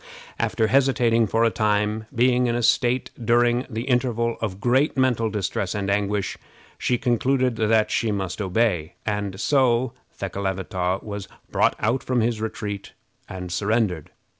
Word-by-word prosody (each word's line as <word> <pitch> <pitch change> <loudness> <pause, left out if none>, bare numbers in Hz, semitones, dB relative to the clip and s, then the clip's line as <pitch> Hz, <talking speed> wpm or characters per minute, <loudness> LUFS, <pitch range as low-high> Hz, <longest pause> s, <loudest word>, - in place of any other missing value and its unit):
After 110 - +1
hesitating 120 -3 +3
for 115 +3 +1
a 115 - +3
time, 105 +1 0
being 125 +1 +3
in 120 - 0
a 120 - -1
state 125 +2 +2
during 120 +2 +2
the 115 -1 -3
interval 120 -2 0
of 100 -4 -3
great 130 +7 +2
mental 125 -4 +2
distress 100 -1 -2
and 100 -1 -1
anguish, 100 0 -1 0.4
she 125 - +1
concluded 125 0 +1
that 110 0 +2
she 110 0 +1
must 95 0 -3
obey, 90 -4 0
and 100 -3 -2
so 130 -2 +2 0.3
Thekelavitaw 95 -1 -2
was 100 -2 -6 0.2
brought - - +2
out 115 +5 +1
from 125 -2 0
his 115 -1 0
retreat 105 -3 -5 0.4
and 90 -1 -6
surrendered. 100 -4 0
110 Hz, 145 wpm, -23 LUFS, 100-120 Hz, 0.4 s, hesitating